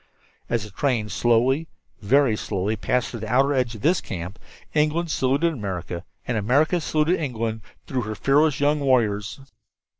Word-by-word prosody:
As 120 -2 0
the 110 - -10
train 115 -1 0
slowly, 120 - +2 0.3
very 125 +2 +3
slowly, 105 0 -2
passed 125 +4 -1
around 115 - -6
the 110 -1 -5
outer 135 +3 +3
edge 125 -3 0
of 105 - -10
this 170 +4 +2
camp, 90 +2 -6 0.3
England 155 +2 +1
saluted 140 +6 +1
America, 90 - -5 0.2
and 120 - 0
America 145 - +2
saluted 155 +3 +1
England 115 -6 -3 0.2
through 130 -2 -2
their 110 -1 -4
fearless 140 +5 +2
young 145 +1 +2
warriors. 115 -4 +1
125 Hz, 155 wpm, -24 LUFS, 110-145 Hz, 0.3 s, very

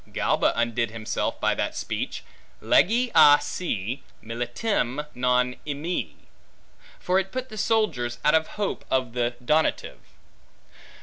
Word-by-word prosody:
Galba - - +1
undid 120 0 0
himself 110 -1 -3
by - - +2
that - - -2
speech, - - -4 0.4
legi 235 +5 +3
a 145 0 +8
se 130 - -3 0.2
militem, 120 - -2
non 125 0 +1
emi; 150 +5 -3 0.8
for 185 +1 +2
it 195 0 -4
put 255 0 -4
the 215 - -9
soldiers 210 - 0
out 150 - +5
of 160 0 +3
hope 205 -2 -2
of 130 -3 0
the 120 0 -1
donative. 155 +4 +1
140 Hz, 125 wpm, -25 LUFS, 120-190 Hz, 0.8 s, a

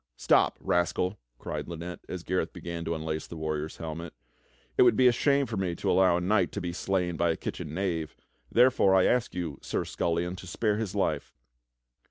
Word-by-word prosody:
"Stop, - - +3
rascal," 90 +3 0 0.2
cried - - -5
Lynette 85 +1 -6
as 90 -2 -5
Gareth 90 -3 -1
began 85 -1 -5
to 85 - -1
unlace 80 0 -3
the 85 - -8
warrior's 80 0 -3
helmet, 80 0 -6 0.6
"it - - +4
would 120 -3 +6
be 130 - +4
a 125 - +8
shame 140 +3 +2
for 115 -5 -4
me 90 -3 -1
to - - 0
allow 95 -2 +4
a - - -2
knight 95 0 +2
to - - -2
be 90 -1 -4
slain 90 -1 -1
by 85 +1 +2
a 80 - 0
kitchen 75 +1 -5
knave. 85 -5 -2 0.4
Therefore 120 -6 +5
I 95 - +5
ask 125 -5 +1
you. 80 -6 -4
Sir - - -2
Scullion, 85 +2 -1
to 95 - -10
spare 105 +3 0
his 105 -3 -3
life." 80 -7 -1
90 Hz, 200 wpm, -28 LUFS, 85-95 Hz, 0.6 s, a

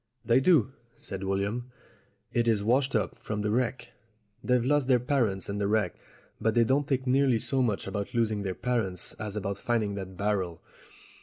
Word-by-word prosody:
"They 120 +1 +5
do," 135 - +4 0.2
said 95 -1 -7
William. 100 +6 -2 0.6
"It 120 0 +1
is 110 -3 +2
washed 130 +4 +2
up 110 - -1
from 105 -1 -3
the 105 - 0
wreck. 120 +1 -1 0.5
They've 125 -1 +2
lost 145 -1 +2
their 125 -2 +5
parents 120 -7 0
in 100 0 -3
the 100 - +1
wreck, 105 +1 +1 0.5
but 110 -1 +1
they 120 - +5
don't 135 +5 +1
think 135 -2 0
nearly 130 -1 +3
so 130 +4 0
much 110 -6 0
about 100 +3 -4
losing 110 -3 +1
their 95 -2 -3
parents 110 -7 -1
as 105 -1 -5
about 100 -1 -3
finding 110 -4 0
that 95 -2 -7
barrel. 95 -4 -1
110 Hz, 180 wpm, -28 LUFS, 100-125 Hz, 0.6 s, They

